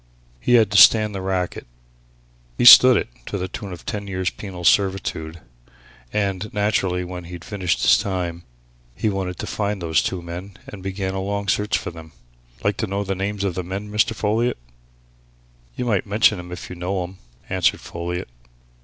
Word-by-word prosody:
He 120 Hz, -, +3 dB
had 110 Hz, -4 st, +4 dB
to 100 Hz, -, +2 dB
stand 105 Hz, 0 st, +7 dB
the 95 Hz, -, -4 dB
racket. 95 Hz, -6 st, -3 dB, 0.9 s
He -, -, +1 dB
stood 125 Hz, +1 st, +10 dB
it -, -, -1 dB, 0.2 s
to -, -, -3 dB
the 95 Hz, -1 st, -3 dB
tune 100 Hz, +1 st, -7 dB
of 90 Hz, -, -9 dB
ten 100 Hz, -1 st, -4 dB
years' 95 Hz, -1 st, -2 dB
penal 95 Hz, -4 st, -8 dB
servitude. 85 Hz, -3 st, +1 dB, 0.7 s
And, 100 Hz, 0 st, -2 dB
naturally, 95 Hz, -3 st, 0 dB
when 90 Hz, -1 st, -7 dB
he'd 90 Hz, 0 st, -9 dB
finished 95 Hz, -6 st, -1 dB
his -, -, +6 dB
time, 90 Hz, -3 st, -3 dB, 0.5 s
he 110 Hz, -, 0 dB
wanted 95 Hz, -2 st, -3 dB
to -, -, -5 dB
find 105 Hz, -1 st, -2 dB
those 80 Hz, -6 st, +1 dB
two 90 Hz, +6 st, -3 dB
men 90 Hz, +3 st, -8 dB
and 100 Hz, -, -10 dB
began 95 Hz, 0 st, -3 dB
a 95 Hz, -, -3 dB
long 100 Hz, +1 st, -3 dB
search 105 Hz, +2 st, +1 dB
for -, -, -6 dB
them. 80 Hz, -2 st, -12 dB, 0.5 s
Like 100 Hz, -1 st, 0 dB
to 110 Hz, -, -2 dB
know 100 Hz, +1 st, -2 dB
the 95 Hz, -1 st, -2 dB
names 100 Hz, +1 st, -3 dB
of 95 Hz, -3 st, 0 dB
the 90 Hz, +1 st, -3 dB
men, 100 Hz, +4 st, -6 dB
Mr. 105 Hz, +2 st, +1 dB
Folliot?" 110 Hz, +4 st, 0 dB, 1.2 s
"You 125 Hz, -, -3 dB
might 105 Hz, -4 st, 0 dB
mention 105 Hz, -1 st, +3 dB
'em 90 Hz, 0 st, -9 dB
if 90 Hz, -, -7 dB
you -, -, -6 dB
know 90 Hz, +1 st, -2 dB
'em," 90 Hz, +1 st, -10 dB, 0.3 s
answered -, -, +1 dB
Folliot. 90 Hz, +1 st, -5 dB
95 Hz, 185 wpm, -22 LUFS, 90-105 Hz, 1.2 s, stood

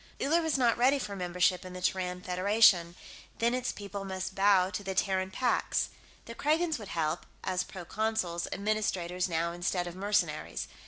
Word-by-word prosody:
Uller 325 Hz, +5 st, +2 dB
was 320 Hz, -3 st, +1 dB
not 235 Hz, -3 st, +2 dB
ready 265 Hz, +4 st, +5 dB
for 205 Hz, -7 st, -5 dB
membership 180 Hz, 0 st, +1 dB
in 185 Hz, 0 st, -9 dB
the 180 Hz, -, -7 dB
Terran 180 Hz, -1 st, -1 dB
Federation; 185 Hz, -2 st, +4 dB, 0.4 s
then 235 Hz, +1 st, +2 dB
its 255 Hz, 0 st, -1 dB
people 200 Hz, -1 st, -6 dB
must 190 Hz, -1 st, -4 dB
bow 195 Hz, -1 st, +4 dB
to 205 Hz, -, -4 dB
the 190 Hz, -1 st, -4 dB
Terran 190 Hz, -1 st, +1 dB
Pax. 245 Hz, +6 st, 0 dB, 0.4 s
The 230 Hz, -, -7 dB
Kragans 310 Hz, +4 st, +1 dB
would 210 Hz, -, -8 dB
help 160 Hz, -2 st, -1 dB, 0.2 s
as 185 Hz, -1 st, 0 dB
proconsuls, 185 Hz, -1 st, -2 dB
administrators, 190 Hz, -3 st, -1 dB
now, 170 Hz, 0 st, 0 dB
instead 175 Hz, +1 st, -1 dB
of 175 Hz, 0 st, -7 dB
mercenaries. 205 Hz, +2 st, -1 dB
190 Hz, 165 wpm, -30 LUFS, 180-220 Hz, 0.4 s, ready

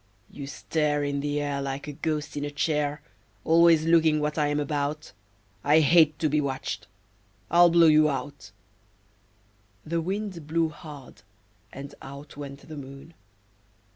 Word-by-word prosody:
You 140 Hz, -1 st, -8 dB
stare 145 Hz, +5 st, -1 dB
In 140 Hz, 0 st, -1 dB
the 145 Hz, +1 st, -1 dB
air 145 Hz, -1 st, -2 dB
Like 140 Hz, +1 st, -4 dB
a -, -, -4 dB
ghost 150 Hz, 0 st, -3 dB
in 145 Hz, -, -3 dB
a 145 Hz, -, -2 dB
chair, 150 Hz, 0 st, -1 dB, 0.4 s
Always 165 Hz, -1 st, +5 dB
looking 160 Hz, -2 st, +4 dB
what 150 Hz, 0 st, -1 dB
I 150 Hz, -2 st, +1 dB
am 145 Hz, 0 st, 0 dB
about; 150 Hz, +1 st, -3 dB, 0.5 s
I 150 Hz, +3 st, +5 dB
hate 155 Hz, 0 st, +5 dB
to 160 Hz, -, 0 dB
be 150 Hz, 0 st, +1 dB
watched 135 Hz, -8 st, -4 dB, 0.6 s
I'll 175 Hz, +1 st, +7 dB
blow 170 Hz, 0 st, +5 dB
you 155 Hz, -1 st, +5 dB
out." 140 Hz, +1 st, -5 dB, 1.4 s
The 165 Hz, +1 st, -1 dB
Wind 190 Hz, -3 st, -4 dB
blew 165 Hz, +1 st, +1 dB
hard, 150 Hz, -4 st, -12 dB, 0.5 s
and 140 Hz, +1 st, -9 dB
out 140 Hz, +2 st, -10 dB
went 140 Hz, -1 st, -9 dB
the 155 Hz, -1 st, -8 dB
Moon. 140 Hz, +3 st, -10 dB
150 Hz, 150 wpm, -26 LUFS, 140-160 Hz, 1.4 s, I'll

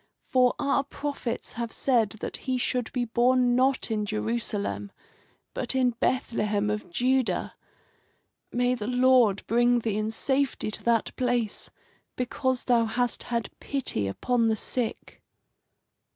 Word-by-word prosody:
For 250 Hz, -1 st, +4 dB
our 280 Hz, 0 st, +1 dB
prophets 285 Hz, -3 st, -4 dB
have 235 Hz, -1 st, -4 dB
said 235 Hz, -6 st, +2 dB
that -, -, -4 dB
he 260 Hz, -1 st, -2 dB
should 250 Hz, -1 st, -1 dB
be 245 Hz, -2 st, -1 dB
born 245 Hz, +1 st, +3 dB
not 260 Hz, -1 st, +2 dB
in 215 Hz, -1 st, 0 dB
Jerusalem, 105 Hz, -, -2 dB, 0.6 s
but -, -, -2 dB
in 255 Hz, -2 st, +3 dB
Bethlehem 210 Hz, -4 st, 0 dB
of 210 Hz, 0 st, -4 dB
Judah. 255 Hz, +6 st, +1 dB, 1.0 s
May 245 Hz, +1 st, +2 dB
the 220 Hz, -4 st, -4 dB
Lord 250 Hz, -5 st, +4 dB
bring 240 Hz, +1 st, +3 dB
thee 215 Hz, -2 st, -1 dB
in 215 Hz, 0 st, -1 dB
safety 265 Hz, 0 st, 0 dB
to -, -, -3 dB
that 230 Hz, -2 st, +1 dB
place, 245 Hz, -4 st, -1 dB, 0.5 s
because 260 Hz, +1 st, -1 dB
thou 235 Hz, -2 st, +3 dB
hast 240 Hz, +2 st, -1 dB
had 235 Hz, -3 st, -1 dB
pity 255 Hz, -, -2 dB
upon 230 Hz, -, +1 dB
the 220 Hz, -, +2 dB
sick." 230 Hz, +2 st, -3 dB
240 Hz, 135 wpm, -27 LUFS, 220-255 Hz, 1.0 s, For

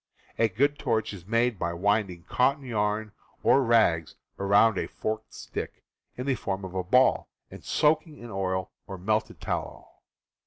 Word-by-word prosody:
A 115 Hz, -, +4 dB
good 140 Hz, +9 st, +1 dB
torch 115 Hz, -5 st, 0 dB
is 90 Hz, -2 st, -11 dB
made 115 Hz, -1 st, +1 dB
by 85 Hz, -, -1 dB
winding 95 Hz, -1 st, 0 dB
cotton 135 Hz, +6 st, +1 dB
yarn 105 Hz, -2 st, -1 dB, 0.3 s
or 140 Hz, -, +5 dB
rags 110 Hz, -10 st, +3 dB, 0.2 s
around 100 Hz, +1 st, +4 dB
a -, -, -2 dB
forked 110 Hz, 0 st, -4 dB
stick, -, -, -7 dB, 0.3 s
in 125 Hz, -, -4 dB
the 140 Hz, -, +2 dB
form 95 Hz, -5 st, -3 dB
of 95 Hz, -, -8 dB
a 95 Hz, -1 st, -1 dB
ball, 125 Hz, +8 st, +3 dB, 0.2 s
and -, -, -11 dB
soaking 155 Hz, 0 st, +1 dB
in 120 Hz, -1 st, -10 dB
oil 95 Hz, -1 st, -2 dB, 0.2 s
or 95 Hz, -1 st, -6 dB
melted 105 Hz, +4 st, -1 dB
tallow. -, -, -4 dB
110 Hz, 160 wpm, -27 LUFS, 95-125 Hz, 0.3 s, or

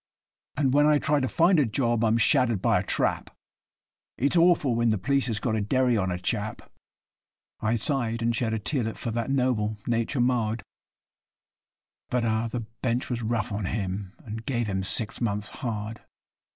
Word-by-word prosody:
And 135 Hz, -3 st, +2 dB
when 145 Hz, +1 st, +5 dB
I 150 Hz, -1 st, +5 dB
try 150 Hz, 0 st, +1 dB
to 130 Hz, -, 0 dB
find 170 Hz, +5 st, +3 dB
a 145 Hz, -, +4 dB
job 120 Hz, 0 st, 0 dB
I'm 115 Hz, 0 st, +3 dB
shaddered 115 Hz, -2 st, +3 dB
by -, -, +2 dB
a -, -, -3 dB
trap -, -, 0 dB, 0.9 s
It's 140 Hz, +6 st, +1 dB
awful 170 Hz, -6 st, +4 dB
when 115 Hz, 0 st, +2 dB
the 110 Hz, -, +2 dB
p'leece 135 Hz, +6 st, +1 dB
has 110 Hz, -3 st, -1 dB
got 115 Hz, -4 st, -1 dB
a 110 Hz, -, 0 dB
derry 125 Hz, +3 st, +2 dB
on 95 Hz, -3 st, 0 dB
a 90 Hz, -, -2 dB
chap.' 105 Hz, +4 st, -3 dB, 0.9 s
I 110 Hz, +2 st, 0 dB
sigh'd 115 Hz, -2 st, 0 dB
and 115 Hz, 0 st, +1 dB
shed 115 Hz, 0 st, 0 dB
a -, -, -1 dB
tearlet 115 Hz, 0 st, -2 dB
for 115 Hz, -, -4 dB
that 115 Hz, +1 st, -2 dB
noble 125 Hz, -6 st, 0 dB
nature 115 Hz, +3 st, -1 dB
marred, 120 Hz, -3 st, +1 dB, 1.5 s
But, 125 Hz, -1 st, 0 dB
ah! 110 Hz, +1 st, 0 dB
the 120 Hz, +1 st, -4 dB
Bench 115 Hz, +3 st, -3 dB
was 120 Hz, -1 st, -2 dB
rough 115 Hz, +1 st, -1 dB
on 100 Hz, -1 st, -3 dB
him, 95 Hz, -1 st, -3 dB
and 110 Hz, 0 st, -6 dB
gave 120 Hz, -2 st, -1 dB
him 95 Hz, -2 st, -2 dB
six 110 Hz, +5 st, 0 dB
months' 105 Hz, -2 st, -1 dB
hard. 110 Hz, -2 st, -4 dB
115 Hz, 180 wpm, -26 LUFS, 110-130 Hz, 1.5 s, when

